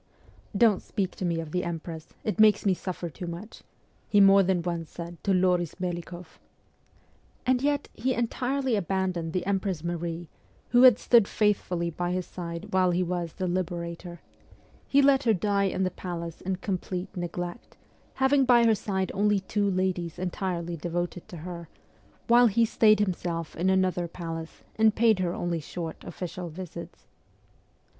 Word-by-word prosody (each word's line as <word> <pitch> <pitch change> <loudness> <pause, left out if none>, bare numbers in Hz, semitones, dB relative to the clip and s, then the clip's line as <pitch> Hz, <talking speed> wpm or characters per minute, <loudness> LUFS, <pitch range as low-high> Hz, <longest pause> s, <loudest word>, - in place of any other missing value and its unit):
' 205 - -10
Don't 205 -4 +1
speak 195 -2 -2
to 185 - -3
me 170 -1 0
of 160 -2 -6
the 180 +1 -1
Empress; 165 -1 -5 0.2
it 215 - -2
makes 215 -1 +5
me 195 - +4
suffer 180 -1 -5
too 170 +3 -7
much,' 175 +6 -8 0.5
he 205 - +4
more 195 0 +7
than 180 -2 +1
once 170 -2 -3
said 170 0 -9
to 200 - +1
Loris 180 -2 +1
Melikoff. 175 -1 -6 1.1
And 250 0 +2
yet 285 0 0
he 255 +3 -1
entirely 255 +2 0
abandoned 185 -3 -1
the 180 +1 -2
Empress 190 -4 -1
Marie, 170 0 -3 0.4
who 245 - +5
had 250 -4 +8
stood 235 -5 +4
faithfully 180 -5 0
by 175 +2 -2
his 180 -1 -2
side 170 +2 -7
while 185 -1 +4
he 180 +1 +1
was 175 -2 -3
the 185 - -3
Liberator; 175 -1 -4 0.7
he 280 0 +4
let 275 -1 +5
her 225 -2 +4
die 200 +1 +1
in 190 0 0
the 185 - 0
palace 170 -2 -6
in 190 0 -2
complete 185 0 -4
neglect, 175 +2 -5 0.4
having 270 +1 +3
by 240 -2 +5
her 225 - +5
side 195 -3 -2
only 205 0 +2
two 200 +1 0
ladies 185 -3 -1
entirely 180 -2 -3
devoted 175 +2 -4
to 175 - -9
her, 170 0 -8 0.6
while 240 +1 +6
he 230 +2 +3
stayed 215 -2 +4
himself 175 -4 -2
in 180 +3 +1
another 185 -2 +1
palace, 165 -1 -7
and 220 -1 +4
paid 225 -3 +4
her 180 -1 -1
only 175 -1 -2
short 165 +2 -6
official 175 0 -6
visits. 180 +1 -9
185 Hz, 165 wpm, -27 LUFS, 170-205 Hz, 1.1 s, had